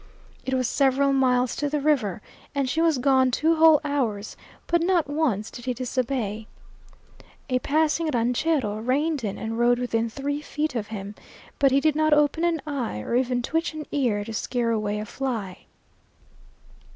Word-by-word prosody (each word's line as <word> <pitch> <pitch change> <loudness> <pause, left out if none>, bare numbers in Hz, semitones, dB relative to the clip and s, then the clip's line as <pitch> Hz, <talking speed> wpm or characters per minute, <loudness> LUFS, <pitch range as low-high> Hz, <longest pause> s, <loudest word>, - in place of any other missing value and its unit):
It 260 - 0
was 255 -2 +1
several 275 +2 +2
miles 255 -2 +2
to 290 0 -1
the 300 +1 -1
river, 255 - 0 0.3
and 275 -2 0
she 315 +6 0
was 325 -4 +3
gone 260 0 +3
two 320 +6 +1
whole 320 -2 +7
hours, 235 -8 -2 0.3
but 340 0 +1
not 345 -2 +2
once 280 -9 -1
did 240 - -10
he 250 -1 -1
disobey. 240 -4 -2 1.0
A 255 - +2
passing 315 +4 +1
ranchero 245 -2 0
reined 275 +5 0
in 200 -2 -3
and 225 +1 -4
rode 240 0 +4
within 230 -2 -1
three 285 +4 -3
feet 300 0 -3
of 220 -4 -3
him, 205 -2 -6 0.5
but 275 - +5
he 270 +1 +3
did 310 +1 +2
not 310 0 +3
open 295 +2 +2
an 335 -3 0
eye 260 - -3
or - - -5
even 250 -1 +1
twitch 325 +3 -1
an 305 -1 -6
ear 235 -8 0
to 225 - -7
scare 235 +1 -1
away 210 -2 -1
a 210 - -4
fly. 220 -7 -5
260 Hz, 175 wpm, -25 LUFS, 230-295 Hz, 1.0 s, whole